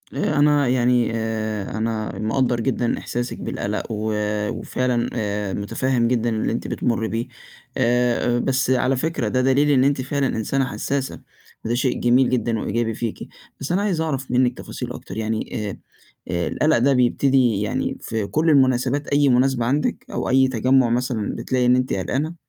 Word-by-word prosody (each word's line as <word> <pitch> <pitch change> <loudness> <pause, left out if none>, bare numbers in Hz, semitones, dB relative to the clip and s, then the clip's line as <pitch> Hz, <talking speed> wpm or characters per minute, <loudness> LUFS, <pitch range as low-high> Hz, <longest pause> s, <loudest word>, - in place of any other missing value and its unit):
آآ - - -1
أنا 145 -1 +4
يعني 125 -1 +2
آآ 110 -2 -3
أنا 110 -1 -3
مقدّر 120 +2 0
جدًا 120 0 0
إحساسِك 120 0 -4
بالقَلَق 105 +1 -3
و 110 0 -2 0.4
وفعلًا 125 -2 -1
آآ 105 -3 -2
متفهِّم 120 +4 0
جدًا 120 -1 +1
اللي 110 -1 -1
أنتِ 115 - -3
بتمُري 115 -2 -1
بيه، 115 +2 -3 0.5
آآ 120 -1 +2
بس 130 0 0
على 130 +1 +2
فكرة 150 -4 -1
ده 130 +4 +1
دليل 135 +3 +3
إن 130 -2 +4
أنتِ 140 -1 +2
فعلًا 140 +1 -1
إنسانة 130 +4 -1
حسّاسة، 135 +1 -3 0.4
وده 115 +2 0
شيء 130 0 0
جميل 125 +2 +3
جدًا 120 -3 0
وإيجابي 115 +2 -1
فيكِ. 115 0 -5 0.3
بس 140 - -4
أنا 185 +3 +2
عايز 190 -6 0
أعرف 135 -5 -3
منِك 125 0 +2
تفاصيل - - -6
أكتر، 95 - -9
يعني 110 0 -3
آآ - - -7 0.5
آآ 85 -1 -1
القَلَق 155 0 +2
ده 135 +4 +3
بيبتدي 125 -3 +2
يعني 105 - -2
في 110 -2 -3
كل 155 +7 +1
المناسبات 135 0 +2
أي 145 0 +3
مناسبة 125 -1 +2
عندِك 140 +5 -1
أو - - -2
أي 130 0 +4
تجمُّع 130 +1 +3
مثلًا 120 -3 -1
بتلاقي 130 -1 0
إن 125 +1 +5
أنتِ 130 0 0
قلقانة؟ 140 - -2
125 Hz, 170 wpm, -22 LUFS, 115-135 Hz, 0.5 s, إن